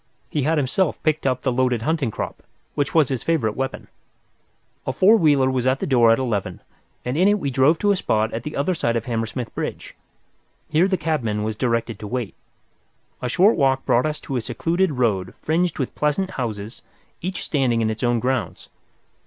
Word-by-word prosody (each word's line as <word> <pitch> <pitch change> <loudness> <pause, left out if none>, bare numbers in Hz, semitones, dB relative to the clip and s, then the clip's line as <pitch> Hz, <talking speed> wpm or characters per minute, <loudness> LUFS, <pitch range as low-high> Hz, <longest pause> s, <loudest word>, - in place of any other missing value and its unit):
He 150 - 0
had 155 +4 +1
himself 150 +5 +1
picked 155 -2 +1
up 130 -1 0
the 130 - +1
loaded 125 -2 +1
hunting 155 -3 0
crop, - - -5 0.3
which 145 +1 -2
was 155 -4 +4
his 130 -4 -2
favourite 130 -11 0
weapon. 135 0 -4 1.0
A - - 0
four 205 +4 +6
wheeler 145 -9 +3
was 130 -1 0
at 130 +1 +2
the - - -2
door 120 -4 +4
at 115 - +5
eleven, 115 -7 -2 0.5
and 125 +2 -2
in 180 +5 +4
it 205 0 +4
we 140 -8 -2
drove 135 +5 +4
to 205 +3 +2
a - - +3
spot 110 - 0
at 115 - -3
the 150 +5 -6
other 145 +7 +1
side 120 -8 0
of 115 -1 -2
Hammersmith 115 0 -3
Bridge. - - -5 0.8
Here 165 +4 +3
the 190 -1 +1
cabman 115 -12 -1
was 110 0 -2
directed 115 -2 -1
to 105 - -6
wait. 120 -2 -3 0.9
A 125 - -2
short 190 - +4
walk 135 -2 +1
brought 125 +5 +3
us 150 0 -3
to 135 - -3
a - - -1
secluded 165 +9 0
road 105 -8 0
fringed 170 +3 0
with 130 - -3
pleasant 170 +6 0
houses, 110 -3 -5 0.4
each 185 +2 -4
standing 130 -6 +1
in 110 0 +1
its 110 - -6
own 120 -1 +2
grounds. 125 -1 -2
130 Hz, 200 wpm, -22 LUFS, 115-155 Hz, 1.0 s, four